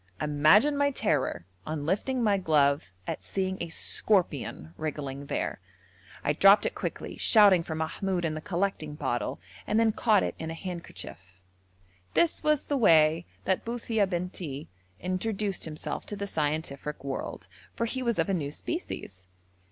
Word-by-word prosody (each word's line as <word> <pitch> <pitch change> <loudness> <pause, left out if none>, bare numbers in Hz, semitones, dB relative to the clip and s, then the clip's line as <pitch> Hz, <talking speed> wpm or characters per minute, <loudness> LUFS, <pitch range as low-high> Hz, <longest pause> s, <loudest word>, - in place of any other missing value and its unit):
Imagine 155 - +4
my 285 0 +3
terror 155 - 0 0.2
on 155 -2 -4
lifting 235 - 0
my 210 -2 +4
glove 145 - +2
at - - -4
seeing 190 -1 -2
a 170 - -3
scorpion 160 - 0
wriggling 140 -1 -4
there. - - -2 0.6
I 145 - +2
dropped 195 +6 +6
it - - 0
quickly, - - -5
shouting 205 -5 +6
for 165 -1 -5
Mahmoud 175 +3 -1
and 155 -1 -1
the 155 - -5
collecting 175 -5 -2
bottle, 125 - -2 0.3
and 215 - +2
then 225 -1 +4
caught 215 -1 +3
it - - -1
in 160 - -4
a 165 - -4
handkerchief. 175 -1 -7 1.0
This 340 - +2
was 305 -2 +2
the 285 - 0
way 165 -6 +5 0.2
that 190 - +1
Buthia 230 -3 0
Bentii 175 -5 -4 0.3
introduced 195 - -1
himself 155 -1 -5
to 205 - -4
the 200 0 -3
scientific 150 -4 -2
world, 135 -1 -5 0.3
for 230 - 0
he 260 +3 -3
was 235 -2 0
of - - +2
a 195 - 0
new 150 -6 -1
species. 95 - -6
175 Hz, 155 wpm, -28 LUFS, 150-210 Hz, 1.0 s, dropped